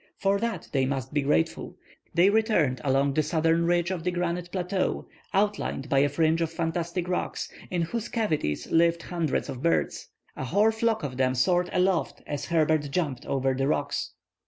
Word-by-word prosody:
For 200 0 +1
that 230 -5 -3
they 135 -2 +1
must 135 -1 -3
be 145 - +2
grateful. 155 +4 0 0.4
They 180 +4 +4
returned 205 - +2
along 135 0 +2
the 155 - +3
southern 165 +2 +1
ridge 175 +1 +2
of 175 -4 -3
the 180 - +1
granite 175 0 -2
plateau, 185 0 -1 0.2
outlined 195 -9 0
by 135 - +3
a 145 +1 +3
fringe 160 +3 +2
of 165 -1 0
fantastic 170 +1 -2
rocks, 180 - -2 0.2
in 175 -2 0
whose 230 +7 -3
cavities 155 - -1
lived 170 +1 +3
hundreds 165 -6 -1
of 125 - -6
birds. 80 - 0 0.3
A 130 - -4
whole 205 - +3
flock 220 -2 0
of 130 -3 -4
them 130 -1 +2
soared 175 +7 +2
aloft 180 -2 0
as 145 -1 -4
Herbert 155 -2 +1
jumped 140 -5 -2
over 135 -1 +1
the 135 +1 0
rocks. 150 - -1
165 Hz, 180 wpm, -27 LUFS, 140-180 Hz, 0.4 s, They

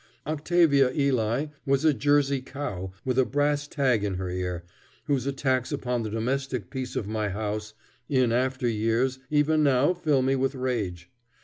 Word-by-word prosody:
Octavia 155 -3 +3
Ely 130 -2 +1 0.2
was 140 +1 +1
a 155 - +5
Jersey 140 +1 +2
cow 105 -10 -5
with 130 0 +1
a - - +6
brass 145 +2 0
tag 130 -8 +1
in 100 -2 -1
her 90 -1 -3
ear, 90 -1 -3 0.4
whose 140 -3 0
attacks 130 -2 0
upon 125 -4 -1
the 110 - -3
domestic 125 -1 -2
peace 130 -1 -5
of - - -1
my 110 -1 -1
house 105 +1 -4 0.3
in 130 -4 +3
after 130 +1 0
years 115 +4 0
even 150 +1 +3
now 140 +3 +3
fill 150 -7 +1
me 135 +1 +2
with 135 +1 0
rage. 105 -10 -3
130 Hz, 165 wpm, -26 LUFS, 110-140 Hz, 0.4 s, a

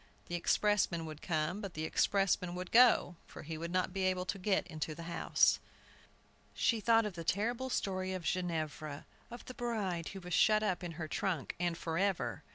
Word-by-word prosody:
The - - -5
expressman 175 -2 +1
would 155 -1 -8
come, 165 +4 -1
but 200 -4 -6
the 155 - -3
expressman 180 +1 +1
would 180 0 -6
go, 230 -7 +5
for - - -10
he 160 +1 -5
would 165 +2 -5
not 185 +1 0
be 195 - -2
able 185 -1 0
to 195 +1 -3
get 190 +1 +1
into 155 0 -4
the 170 - -8
house! 170 0 +2 1.0
She 230 - +2
thought 225 +1 +4
of 210 - -3
the 170 -1 -6
terrible 235 +9 -1
story 185 -5 -1
of 185 -2 -4
Ginevra, 155 -4 -3 0.2
of 240 +1 -9
the 255 - -8
bride 205 -9 -2
who 195 - -6
was 180 -1 -7
shut 215 0 +4
up 185 -3 -1
in 170 -1 -5
her 160 0 -5
trunk, 165 -2 -2
and 175 -1 0
forever! 180 +4 -1
180 Hz, 190 wpm, -34 LUFS, 165-205 Hz, 1.0 s, go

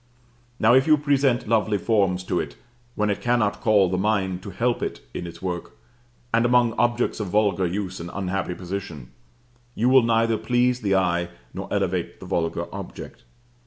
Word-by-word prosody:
Now 115 +2 +5
if 130 +3 +4
you 155 -1 +6
present 140 -4 +1
lovely 110 -2 +2
forms 100 -4 +1
to - - -1
it - - -5 0.4
when 105 0 +1
it 100 - -3
cannot 110 -4 +1
call 105 -4 +4
the 90 +1 -1
mind 95 -3 0
to 100 - -8
help 115 +6 -1
it - - -4
in 85 - -5
its 85 +1 -11
work, 90 -8 -5 0.6
and 115 +1 +4
among 120 -1 +3
objects 120 0 0
of 105 - -3
vulgar 100 -2 +2
use 95 +1 -4
and 85 +1 -6
unhappy 95 -2 -3
position, 85 -9 -6 0.6
you 120 +4 +2
will 130 0 +7
neither 115 -1 +2
please 125 0 +1
the 100 -3 +1
eye 85 -2 +1 0.2
nor - - -7
elevate - - -1
the - - -10
vulgar 80 -1 -1
object. - - -9
105 Hz, 175 wpm, -24 LUFS, 95-120 Hz, 0.6 s, will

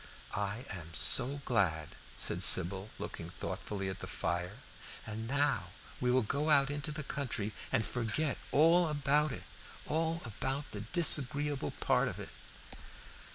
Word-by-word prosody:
"I 105 +5 -3
am 85 -4 -6
so 140 - +5
glad," 85 -10 0 0.3
said - - +2
Sybil, 95 +4 +6
looking - - -7
thoughtfully 100 -2 -5
at 95 - -5
the - - -7
fire. 90 +3 -3 0.5
"And 110 +1 -6
now 140 +2 0 0.3
we 125 - 0
will 125 0 +3
go 140 +8 -2
out 140 -2 +4
into 145 +1 -4
the 150 +1 -6
country 120 -7 -4 0.2
and 110 - +1
forget 125 +5 -2
all 165 +4 +4
about 150 0 +1
it 125 - -7 0.4
all 165 +2 -2
about 135 +5 -4
the 100 - -6
disagreeable 145 +1 +2
part - - +2
of - - -5
it." - - -7
130 Hz, 145 wpm, -32 LUFS, 105-145 Hz, 0.5 s, Sybil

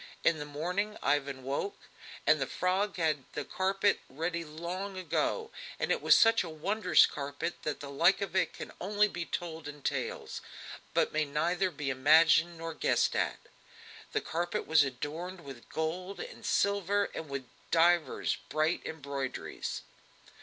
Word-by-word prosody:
In 165 -2 +3
the 150 - -4
morning 180 +8 -2
Ivan 140 -1 0
woke, 140 - -3 0.5
and - - +4
the - - 0
frog 190 +2 0
had 160 -3 +2
had 135 - -23
the 145 - -3
carpet 195 +2 +1
ready 165 +5 -2
long 175 +5 -5
ago, 445 - -1 0.3
and - - -1
it - - +1
was - - +7
such 225 -1 +5
a 170 - -6
wondrous 180 +2 +4
carpet 145 +4 -4
that 150 - -3
the 140 - -6
like 170 +7 +4
of 195 -2 -4
it 190 - +2
can - - -8
only 205 +2 +3
be 175 -4 -5
told 165 -3 -4
in 150 -1 -9
tales, - - -3 0.5
but - - +2
may 155 0 +2
neither 170 +6 +1
be 150 -6 -3
imagined 160 +5 +5
nor 165 0 -5
guessed - - +2
at. - - 0 0.7
The - - 0
carpet 175 +1 -2
was 160 -1 +5
adorned 155 +8 -5
with 135 -5 -11
gold 180 +5 -3
and 485 +1 -8
silver 200 0 +1
and 160 - -6
with 140 -2 -4 0.2
divers 170 0 +3
bright 155 +2 +1
embroiderings. 140 -4 -4
165 Hz, 160 wpm, -31 LUFS, 150-185 Hz, 0.7 s, was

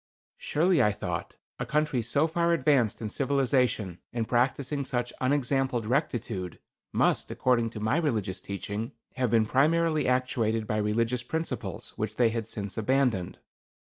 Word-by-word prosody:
Surely, 170 +2 +2
I 105 - +4
thought, 100 - -4 0.2
a - - -2
country 150 -4 +1
so 130 +7 +1
far 170 +1 +1
advanced 130 -8 +2
in 110 - -2
civilization, 130 - +1
and 115 -2 -2
practicing 135 +3 +1
such 125 -2 -2
unexampled 130 -3 +1
rectitude, 110 - -1 0.3
must, - - +2
according 120 -3 +1
to 110 - -8
my 110 +7 +1
religious 110 - -1
teaching, 100 +3 -4 0.2
have 125 -2 +1
been 110 0 +4
primarily 155 +4 +2
actuated 120 -3 +1
by 105 - -1
religious 115 +3 0
principles 160 +7 -4
which 110 0 -3
they 120 -1 +4
had 115 -1 -3
since 100 0 -4
abandoned. 120 -6 +1
125 Hz, 140 wpm, -28 LUFS, 110-140 Hz, 0.3 s, I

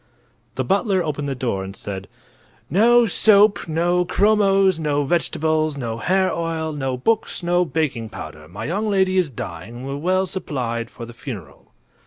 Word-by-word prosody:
The 130 - -1
butler 195 - +1
opened 145 -2 -3
the 135 - -2
door 115 -7 -2
and 95 +1 -8
said: 95 -1 -6 0.6
"No 235 +7 +5
soap, 210 -1 +4
no 175 +3 +1
chromos, 195 -2 +3
no 145 -2 0
vegetables, 155 -1 0
no 115 -3 -4
hair 185 +6 +2
oil, 165 -1 -2
no 135 -3 -2
books, 215 - 0
no 175 +1 +2
baking 140 -9 -2
powder. 75 -6 -9
My 90 +5 -7
young 205 +7 -1
lady 190 -2 +2
is 175 -5 +1
dying 95 -2 -7
and 125 +2 -7
we're 135 +1 -4
well 185 +5 +1
supplied 125 -11 -3
for 115 - -9
the 120 - -11
funeral." 105 - -9
155 Hz, 165 wpm, -21 LUFS, 120-190 Hz, 0.6 s, No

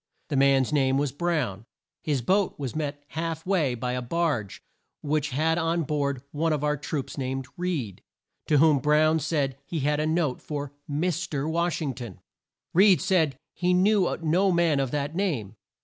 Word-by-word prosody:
The 150 - -1
man's 135 0 +3
name 135 -2 +3
was 145 -1 0
Brown. 140 - -2 0.3
His 140 -5 -1
boat 195 - +1
was 135 -2 -5
met 145 -2 -3
half 160 0 -4
way 165 -10 +1
by 125 +1 -3
a 125 - -2
barge 125 - -2 0.4
which 150 -1 0
had 160 +5 +1
on 165 0 0
board 140 -3 -1
one 160 +2 0
of 150 -1 -2
our 150 0 +2
troops, 145 0 -4
named 130 0 -3
Reed, 160 - -3 0.5
to 150 - +4
whom 150 -1 +5
Brown 155 +3 +3
said 140 -3 -1
he 160 +2 -4
had 150 +2 +1
a 155 - 0
note 160 -5 0
for 145 -2 -5
Mis 170 +4 -1
ter 145 0 -2
Wash 170 0 0
ing 140 -3 -2
ton. 120 -7 -8 0.5
Reed 190 -1 +6
said 165 -7 +2
that - - -27 0.2
he 180 0 +1
knew 195 0 +3
no 180 +5 +3
man 170 -4 +2
of 135 -2 0
that 145 +2 -2
name. 140 - -2
150 Hz, 180 wpm, -26 LUFS, 135-165 Hz, 0.5 s, Reed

